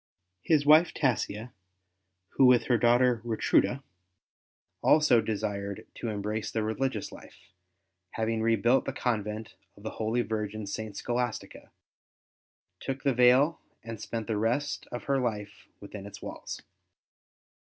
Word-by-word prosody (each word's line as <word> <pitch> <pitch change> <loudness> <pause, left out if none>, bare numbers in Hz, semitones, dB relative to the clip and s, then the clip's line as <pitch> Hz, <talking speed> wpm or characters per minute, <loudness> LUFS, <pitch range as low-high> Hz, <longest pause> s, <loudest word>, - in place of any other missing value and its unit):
His 150 - +2
wife 155 +3 +6
Tassia, 120 -3 -1 0.8
who 130 - +4
with 125 -1 +5
her 120 - +2
daughter 120 0 +3
Ratruda 120 +3 +1 1.0
also 150 -7 +5
desired 100 -2 -3
to - - -6
embrace 105 +1 -3
the 110 - -2
religious 110 0 -2
life, - - -15 0.6
having 110 0 -1
rebuilt 115 +3 +3
the 135 - -3
convent 110 -2 -3 0.2
of 100 - -16
the 110 - -4
holy 115 +2 +1
virgin 110 -1 -4
St. 105 0 -5
Scholastica, 120 -1 -3 1.1
took 135 0 -5
the 140 -2 +2
veil 125 +6 +4 0.2
and 115 -2 -7
spent 115 0 -4
the 110 -1 -2
rest 125 +7 -1
of 120 - -5
her 140 -1 +1
life 105 -5 -4
within 100 0 -9
its 100 0 -10
walls. - - -7
115 Hz, 130 wpm, -28 LUFS, 105-125 Hz, 1.1 s, wife